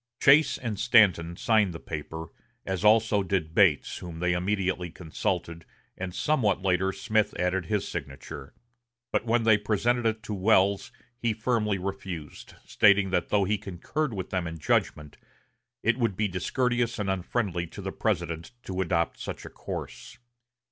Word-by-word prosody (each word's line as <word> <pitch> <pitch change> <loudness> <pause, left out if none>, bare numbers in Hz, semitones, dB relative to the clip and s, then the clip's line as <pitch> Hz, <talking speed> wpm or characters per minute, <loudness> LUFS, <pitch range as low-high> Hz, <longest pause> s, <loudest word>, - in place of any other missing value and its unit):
Chase 145 +3 +5
and 110 -5 -4
Stanton 85 -7 +4
signed 110 -6 +2
the - - -6
paper, 80 +1 -6 0.4
as 95 0 -3
also 105 -1 +4
did 90 -5 -1
Bates, 85 -7 +3
whom 85 -2 -8
they 90 +1 +1
immediately 90 -1 -1
consulted, 85 0 -3 0.3
and 95 -1 -5
somewhat 110 -11 +1
later 95 0 +2
Smith 110 +2 0
added 90 0 0
his 105 0 -1
signature. 70 -3 -7 0.6
But - - 0
when 115 +1 +2
they 110 -2 +5
presented 115 +3 +1
it 110 0 -2
to 105 - -5
Welles, 100 0 +2 0.3
he 115 -2 0
firmly 110 -3 0
refused, 95 -4 -6
stating 100 -2 +4
that 90 -2 0
though 105 -1 +3
he 105 +2 0
concurred 105 - -3
with 95 -2 -5
them 90 -3 -1
in 80 0 -6
judgment, 75 -1 -1 0.7
it 115 +2 +2
would 115 -6 0
be 110 - +1
discourteous 120 +6 0
and 105 -2 -2
unfriendly 95 -2 -1
to 90 - -12
the 95 - -3
President 85 -3 -2
to 95 0 -3
adopt 85 -2 0
such - - -6
a - - -9
course. - - -7
95 Hz, 155 wpm, -27 LUFS, 85-110 Hz, 0.7 s, Chase